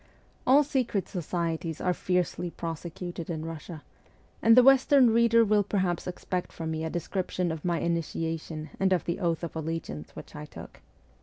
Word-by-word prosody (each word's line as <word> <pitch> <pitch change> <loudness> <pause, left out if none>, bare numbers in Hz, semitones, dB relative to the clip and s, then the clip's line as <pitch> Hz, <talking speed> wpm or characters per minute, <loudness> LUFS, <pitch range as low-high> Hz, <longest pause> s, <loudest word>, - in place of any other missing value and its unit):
All 275 +4 +7
secret 255 -8 -1
societies 165 -2 -3
are 180 - +1
fiercely 180 0 -1
prosecuted 170 +1 -6
in 160 -2 -3
Eussia, 165 -1 -7 0.6
and 225 +1 +6
the 250 - +9
western 270 -1 +6
reader 230 0 +5
will 210 0 +4
perhaps 190 -4 -1
expect 180 0 -4
from 160 -1 -5
me 160 0 -3
a 160 - -2
description 180 0 -2
of 160 -2 -5
my 170 -2 0
initiation 165 -2 -3
and 190 -1 +3
of 175 - 0
the 170 - -2
oath 170 -3 0
of 165 - -5
allegiance 160 - -5
which - - -10
I 75 - -6
took. - - -12
175 Hz, 165 wpm, -28 LUFS, 165-195 Hz, 0.6 s, the